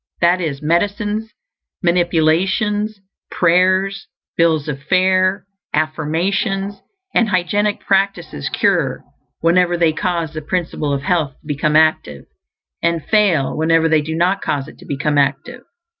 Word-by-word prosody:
That 175 +2 +3
is, 150 -3 -4
medicines, 205 +6 -1 0.5
manipulations, 180 +5 +1 0.3
prayers, 185 +3 +2 0.3
bills 160 -3 +2
of 140 -2 -4
fare, 185 +3 +2 0.3
affirmations, 180 +6 -1 0.3
and 230 -2 +2
hygienic 205 +3 0
practices 190 - -1
cure - - 0 0.4
whenever 175 +1 +3
they 165 -2 +2
cause 170 -2 -2
the 155 - -5
Principle 160 -3 -2
of 140 -1 -2
Health 160 -5 0
to - - -28
become 150 +1 0
active; 155 - +2 0.6
and 170 -2 0
fail 195 -10 +2
whenever 165 +1 +2
they 160 -1 +3
do 160 +2 -4
not 180 +4 +1
cause 140 -1 -2
it - - -14
to - - -14
become 145 +1 0
active. 140 - -1
170 Hz, 130 wpm, -18 LUFS, 155-195 Hz, 0.6 s, That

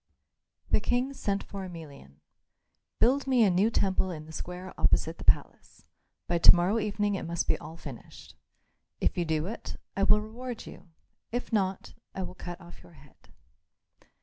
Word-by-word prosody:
The - - +5
King 245 +5 0
sent 200 -6 -1
for 195 -1 -7
Emelian. 145 - -10 0.8
"Build 270 +3 +3
me 255 -3 +5
a 200 - +5
new 190 +5 +4
temple 190 -3 +1
in 155 -4 -6
the 160 - -11
square 180 +3 -6
opposite - - +2
the - - -7
palace; - - 0 0.4
by 170 -1 0
to - - +9
morrow 180 +6 +2
evening 205 -1 0
it 195 - -2
must 170 0 0
all 160 +2 -8
be 170 - -17
finished. 135 -6 -10 0.6
If - - +1
you 175 - 0
do 160 -1 0
it, 220 +5 -6 0.2
I 195 - -1
will 210 +1 +6
reward 235 +3 -6
you; 180 - -12 0.4
if 245 0 -3
not, 190 -3 0 0.2
I 190 - -2
will 180 0 -6
cut 175 -1 -7
off 175 -1 -13
your - - -17
head." 140 - -20
190 Hz, 175 wpm, -29 LUFS, 170-215 Hz, 0.8 s, to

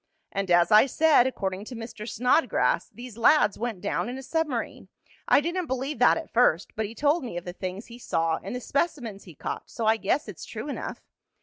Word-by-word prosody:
"And, 195 -1 -3
as 175 +3 +4
I 215 +5 +7
said, 300 -3 +4
according 190 -6 -3
to 250 - -8
Mr. 225 -1 -7
Snodgrass, 250 +9 +2
these 240 -2 -11
lads 230 -4 +4
went 225 -5 -3
down 205 +3 -1
in 250 - -5
a 265 - -8
submarine. 280 -3 -3 0.4
I - - +5
didn't 345 +2 -2
believe 260 +1 -3
that 245 - +5
at 325 - -8
first, 220 -7 +2
but 220 -1 -1
he 225 - -11
told 290 +6 +2
me 230 -9 -5
of 175 - -6
the 175 - -6
things 185 +3 -6
he 235 +1 -12
saw 165 -7 0
and - - -6
the 250 - -4
specimens 255 - -2
he 175 -5 -13
caught, - - -6
so 230 - -4
I 220 +1 +4
guess 220 +8 0
it's - - -9
true - - -6
enough. - - -5
235 Hz, 215 wpm, -26 LUFS, 200-270 Hz, 0.4 s, I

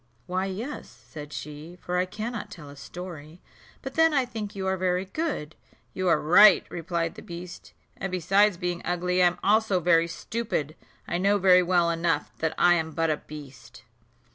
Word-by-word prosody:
"Why, 185 +2 -2
yes," 220 +10 -6
said 150 -1 -11
she, 150 +5 -8
"for 180 0 -2
I 185 - 0
cannot 220 +4 -5
tell 150 -5 -11
a - - -12
story; 160 +2 -9 0.4
but 270 - -6
then 325 0 +4
I 270 -2 +3
think 220 -4 -6
you 190 -1 -4
are 190 0 +1
very 185 0 0
good." 195 - -4 0.4
"You 185 0 -2
are 165 -3 +4
right," 190 +6 +7
replied 170 -1 -2
the - - -11
beast; 175 +1 -10 0.2
"and, 195 - -4
besides 195 +2 +3
being 175 0 -3
ugly, 180 +1 0
I 180 - +7
am 175 0 -1
also 210 -2 +3
very 170 -1 +3
stupid: 170 - -3 0.3
I 175 - -1
know 200 +2 +3
very 180 -2 +6
well 175 -1 +2
enough 165 -3 -1
that 160 -1 -1
I 175 - +5
am 160 -2 -1
but 165 0 +1
a 150 - 0
beast." 135 -6 -12
180 Hz, 185 wpm, -26 LUFS, 165-195 Hz, 0.4 s, right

